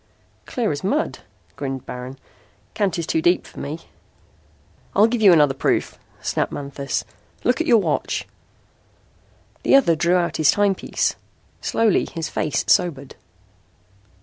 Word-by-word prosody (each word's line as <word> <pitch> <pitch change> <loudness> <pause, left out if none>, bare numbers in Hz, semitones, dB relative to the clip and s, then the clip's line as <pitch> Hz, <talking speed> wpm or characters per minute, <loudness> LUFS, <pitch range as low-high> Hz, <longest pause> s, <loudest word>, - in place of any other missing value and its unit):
"Clear 235 -7 -1
as 145 +2 -4
mud," 290 +12 -1 0.4
grinned 135 -2 -5
Baron. 125 +2 -7 0.6
"Kant 190 -4 0
is 170 - -2
too 320 - 0
deep 350 +1 +2
for - - -12
me." - - -5 1.1
"I'll 205 - +6
give 230 0 0
you 200 -3 +8
another 150 -5 +5
proof," 135 - -1 0.2
snapped - - -1
Manthis. 140 -1 -3 0.4
"Look 250 +6 +2
at 325 - -2
your 235 - +6
watch." 205 - -1 1.3
The - - +4
other 245 -12 +5
drew 170 +3 +2
out 175 -1 0
his 155 -2 +3
timepiece. 205 -2 +1 0.5
Slowly 225 -3 +2
his 165 -2 -4
face 150 - -1
sobered. 140 -7 +1
175 Hz, 135 wpm, -22 LUFS, 145-220 Hz, 1.3 s, you